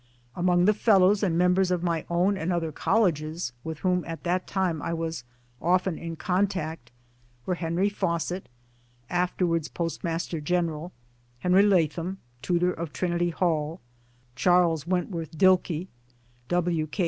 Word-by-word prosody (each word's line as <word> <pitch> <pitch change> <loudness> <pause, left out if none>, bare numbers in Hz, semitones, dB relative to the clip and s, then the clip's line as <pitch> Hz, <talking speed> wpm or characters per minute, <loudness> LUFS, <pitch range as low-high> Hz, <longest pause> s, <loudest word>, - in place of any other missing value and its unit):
Among 175 0 +3
the 210 - +5
Fellows 200 -2 +4
and 180 -5 +1
members 180 +1 +3
of 180 -1 0
my 170 -3 -1
own 180 +4 +2
and 180 -1 -2
other 165 -2 -1
colleges 160 - 0
with 160 -1 -5
whom 180 -1 +2
at 165 0 -6
that 180 +1 -1
time 180 -5 -1
I 170 0 -2
was 165 -5 -4 0.4
often 185 0 +1
in 165 0 -5
contact 170 -7 -1 0.6
were 185 - 0
Henry 175 +2 0
Fawcett 175 -2 -2 0.6
(afterwards 175 -2 0
Post 165 -1 -4
master 165 -1 -2
General), 170 0 -1 0.5
Henry 180 +2 +5
Latham 180 -2 +2 0.2
(Tutor 180 +4 +1
of 165 -2 -5
Trinity 175 0 0
Hall), 165 -1 -1 0.6
Charles 170 0 +3
Wentworth 170 -3 -2
Dilke, 180 -2 +3 0.6
iWi. 170 -3 0
K. 205 - -10
175 Hz, 135 wpm, -26 LUFS, 165-185 Hz, 0.6 s, the